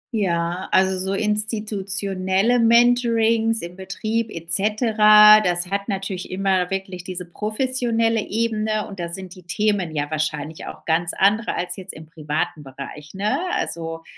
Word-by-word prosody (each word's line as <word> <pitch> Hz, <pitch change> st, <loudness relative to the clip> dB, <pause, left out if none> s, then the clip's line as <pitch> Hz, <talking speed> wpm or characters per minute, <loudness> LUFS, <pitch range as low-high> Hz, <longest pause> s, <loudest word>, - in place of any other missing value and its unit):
Ja 175 Hz, -3 st, -1 dB
also 190 Hz, 0 st, +2 dB
so 190 Hz, +1 st, -2 dB
institutionelle 205 Hz, 0 st, -1 dB
Mentorings 230 Hz, -1 st, +3 dB
im 175 Hz, +1 st, -8 dB
Betrieb 215 Hz, +4 st, -3 dB
et 165 Hz, -2 st, -6 dB
cetera 210 Hz, +2 st, +6 dB
das 180 Hz, 0 st, -1 dB
hat 200 Hz, +1 st, -2 dB
natürlich 195 Hz, -2 st, -4 dB
immer 185 Hz, -1 st, 0 dB
wirklich 190 Hz, -2 st, -5 dB
diese 180 Hz, 0 st, -6 dB
professionelle 225 Hz, +3 st, 0 dB
Ebene 215 Hz, -1 st, -1 dB
und 195 Hz, -2 st, -10 dB
da 170 Hz, -1 st, -3 dB
sind 185 Hz, +1 st, -6 dB
die 185 Hz, -, -14 dB
Themen 185 Hz, -2 st, -1 dB
ja 145 Hz, +1 st, -2 dB
wahrscheinlich 155 Hz, 0 st, -3 dB
auch -, -, -10 dB
ganz 170 Hz, +2 st, 0 dB
andere 210 Hz, +4 st, +2 dB
als 180 Hz, -, -2 dB
jetzt 190 Hz, 0 st, -8 dB
im 155 Hz, +1 st, -11 dB
privaten 155 Hz, -1 st, -4 dB
Bereich 140 Hz, +2 st, -10 dB
ne? 205 Hz, +3 st, 0 dB
Also, 165 Hz, -1 st, -3 dB
195 Hz, 145 wpm, -22 LUFS, 175-215 Hz, -, cetera